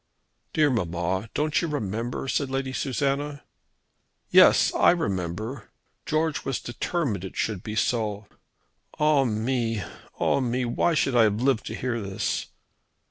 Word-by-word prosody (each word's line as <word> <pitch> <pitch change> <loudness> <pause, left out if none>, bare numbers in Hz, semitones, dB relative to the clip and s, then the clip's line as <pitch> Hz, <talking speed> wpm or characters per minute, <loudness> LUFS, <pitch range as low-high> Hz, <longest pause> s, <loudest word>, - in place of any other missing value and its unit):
"Dear 150 -2 +3
mamma, 90 -1 -1
don't 150 0 +1
you 170 - -1
remember?" 120 -3 -3
said 140 0 0
Lady 135 0 -2
Susanna. 140 +2 -1 0.9
"Yes; - - +6
I - - +5
remember. 105 - -2 0.4
George 155 0 0
was 135 - -2
determined 120 - -2
it 95 - -7
should 105 -5 -1
be 105 +1 -6
so. 110 -3 0 0.7
Ah 150 -3 +4
me! 115 -1 -1 0.4
ah - - +2
me! 125 -1 0
Why 140 +7 +1
should 135 -4 +1
I 115 -2 +6
have 105 0 +1
lived 130 -4 +1
to - - -4
hear 120 -2 -2
this!" 100 -1 -2
120 Hz, 135 wpm, -26 LUFS, 105-140 Hz, 0.9 s, Yes